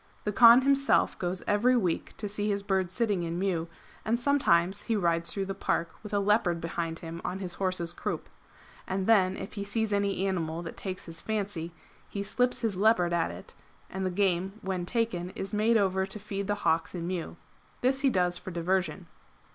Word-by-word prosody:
The 210 - -2
Kaan 235 +3 +8
himself 275 0 +3
goes 180 0 -2
every 240 +5 +3
week 180 -7 -1
to 210 - -3
see 205 +1 -2
his 200 -1 -1
birds 190 -3 0
sitting 205 -3 0
in 170 0 -3
mew, 175 -3 -1 0.4
and 230 +2 0
sometimes 205 -9 +2
he 230 - +1
rides 170 -3 +1
through 195 -1 -2
the 195 - -3
park 170 -3 -1
with 210 - -9
a 205 - +1
leopard 200 -4 +2
behind 165 0 -3
him 165 +1 -6
on 185 - -3
his 185 -2 -5
horse's 185 -3 0
croup; - - -4 0.6
and 190 0 -1
then 190 -4 +4
if - - -7
he 200 - -4
sees 215 +1 -1
any 200 -1 +1
animal 170 -3 -2
that 165 - -7
takes 185 -2 -5
his 165 -1 -6
fancy, 200 -6 -3 0.4
he 200 - -3
slips 250 +4 0
his 225 -4 0
leopard 185 -3 +3
at 170 -1 +1
it,^ 85 +2 -10 0.4
and 190 +1 -3
the 185 - +1
game 190 0 +1
when 185 -2 -2
taken 225 -7 -1
is 195 +2 -5
made 220 +2 +3
over 190 -2 +1
to 195 - -4
feed 200 -1 -4
the 205 - +1
hawks 160 +2 +1
in 170 -1 -4
mew. 175 -2 -4 0.4
This 265 +2 +2
he 270 0 +3
does 180 -5 +1
for - - -8
diversion. 185 +1 -1
190 Hz, 200 wpm, -29 LUFS, 175-210 Hz, 0.6 s, Kaan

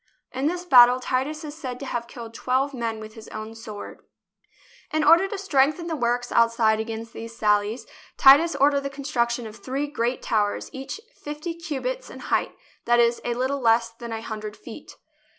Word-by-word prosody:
In 265 +3 -1
this 355 +2 -2
battle 250 -5 +7
Titus 270 +5 -2
is 295 -1 -6
said 255 -5 -6
to 275 - -6
have 240 -2 -3
killed 235 -2 -9
twelve 260 +4 0
men 230 -3 -3
with 215 0 -9
his 220 -1 -12
own 215 +1 -7
sword. 220 -2 -9
JERUSALEM - - -33 0.8
In 310 0 +2
order 340 +5 +6
to 410 - -5
strengthen 310 -3 +1
the 335 -1 -2
works 245 -2 -1
outside 230 -2 +3
against 225 0 -5
these 230 0 -8
sallies 210 +2 +1 0.3
Titus 290 +5 +7
ordered 280 0 +3
the 275 - -4
construction 250 -4 -1
of 215 0 -9
three 270 +3 -3
great 250 -4 -2
towers, 210 -2 0
each 270 +9 -6 0.2
fifty 300 +3 -5
cubits 335 - -4
in - - -10
height - - -1 0.2
— - - -35
that 240 0 +4
is, 235 0 +3
a 240 - -1
little 260 +3 -1
less 230 -1 +3
than 235 0 -9
a 225 0 -4
hundred 215 -1 -6
feet. - - -11
245 Hz, 190 wpm, -24 LUFS, 230-285 Hz, 0.8 s, battle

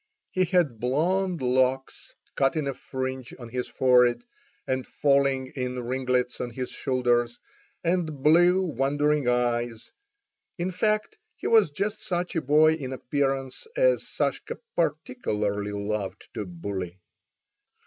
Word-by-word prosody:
He 185 0 +2
had 170 - +1
blonde 170 - 0
locks 130 +1 0 0.2
cut 135 +3 +2
in 155 -2 0
a 140 - -1
fringe 130 -1 -5
on 120 -2 -9
his 125 +1 -3
forehead 125 -2 +4 0.4
and 130 0 -2
falling 140 -2 +1
in 125 -1 -3
ringlets 125 0 -1
on 120 - -3
his 125 +2 -5
shoulders, 120 -2 +1 0.5
and 165 -5 -1
blue, 175 +4 +5
wondering 145 -1 +1
eyes; 120 -2 0 0.7
in 180 +1 -2
fact, 215 - 0 0.2
he - - -11
was 220 -7 +5
just 200 +8 -3
such 175 0 -2
a 165 - +1
boy 155 +3 +5
in 135 -5 -4
appearance 135 - -2
as - - +4
Sashka - - -2 0.2
particularly 105 - -1
loved 100 -2 -4
to 105 - -4
bully. 90 0 -5
130 Hz, 130 wpm, -26 LUFS, 120-160 Hz, 0.7 s, blue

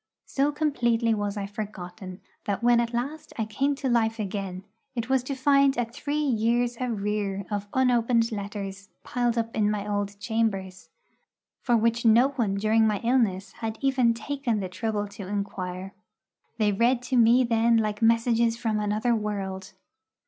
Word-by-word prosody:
So 280 +2 +1
completely 240 -7 +1
was 205 -1 -2
I 200 - -2
forgotten, 190 -2 -7 0.2
that 205 +2 -2
when 240 0 +5
at 235 0 0
last 270 +6 -4
I 220 - 0
came 275 +7 0
to 275 -1 -3
life 225 -2 +2
again, 195 -3 -4 0.3
it 235 0 -3
was 265 -1 +3
to 275 - -3
find 275 0 +3
a 240 - +1
three 285 +6 -4
years' 240 -1 +1
arrear 205 -4 -2
of 205 0 -2
unopened 240 -2 +3
letters 200 -2 -6
piled 240 -1 -1
up 230 0 -2
in 210 -1 +2
my 210 -1 -2
old 205 -1 -2
chambers, 205 -4 -2 0.7
for 240 -2 +2
which 230 +1 +1
no 235 +4 +5
one 235 -8 -1
during 220 +2 +3
my 210 -2 0
illness 225 -6 +1
had 225 -1 -5
even 255 -4 +3
taken 260 -3 -2
the 190 -2 -4
trouble 210 +1 -2
to 200 -1 -9
inquire. 190 -2 -4 0.6
They 210 -2 +2
read 235 +4 +2
to 255 +1 -2
me 240 +1 +6
then 230 0 +3
like 215 -1 -1
messages 230 0 +3
from 225 -3 -1
another 210 +3 +1
world. 200 -3 -3
225 Hz, 165 wpm, -26 LUFS, 205-240 Hz, 0.7 s, me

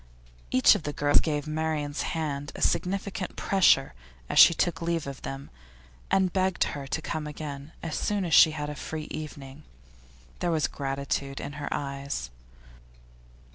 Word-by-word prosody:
Each 130 - +6
of - - -2
the 150 -1 -4
girls 145 0 +4
gave 150 -2 -1
Marian's 155 -1 -2 0.2
hand 145 -2 -3
a - - -7
significant 185 +2 -1
pressure 185 -8 +3 0.4
as - - +3
she 170 - +9
took 170 -1 0
leave 165 -1 -1
of 140 -1 -7
them, 135 +1 -7 0.6
and 190 -2 +2
begged 190 -1 +2
her 140 -2 -6
to 160 - -2
come 155 -2 -3
again 145 -1 -7
as 165 -2 -3
soon 205 -2 0
as 165 - -2
she 160 - +9
had 150 -1 -4
a - - -7
free 155 +1 -6
evening. 145 -2 -7 0.8
There 175 - 0
was 160 -3 +1
gratitude 135 0 -3
in 140 - -6
her - - -3
eyes. 140 - -4
150 Hz, 160 wpm, -27 LUFS, 140-165 Hz, 0.8 s, she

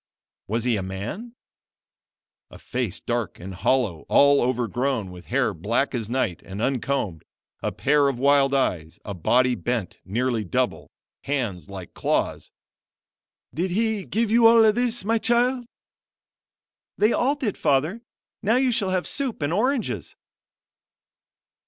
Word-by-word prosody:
Was 115 +2 -1
he 120 -3 +1
a - - -2
man? 105 - -6 1.1
A - - -12
face - - -3
dark - - -3
and 95 +2 -7
hollow, 100 -3 +1
all 140 0 +5
overgrown 120 -3 -1
with 90 -1 -11
hair - - +1
black 115 - -1
as 115 -4 -3
night 120 -8 -1
and 95 +1 -8
uncombed 120 - -1 0.4
a - - -1
pair 145 0 +2
of 135 -3 -1
wild 140 +1 +4
eyes 90 - -1
a 100 - -4
body 125 +8 +2
bent 120 -6 -3
nearly 115 +3 -1
double 90 - -1 0.4
hands 115 -11 -2
like 95 -3 -9
claws. - - -1 1.0
"Did 175 +7 -1
he 215 +2 0
give 225 +2 -1
you 230 0 +6
all 225 -2 +6
this, 240 -2 -1
my 225 +1 +2
child?" 245 +1 +1 1.3
"They 215 +3 +3
all 275 +4 +2
did, 255 -9 -2
Father; 155 +11 +1 0.4
now 220 +4 +2
you 255 0 +3
shall 205 -5 0
have 185 -1 0
soup 260 - -2
and 145 +3 0
oranges." 245 +5 -1
135 Hz, 140 wpm, -24 LUFS, -, 1.3 s, you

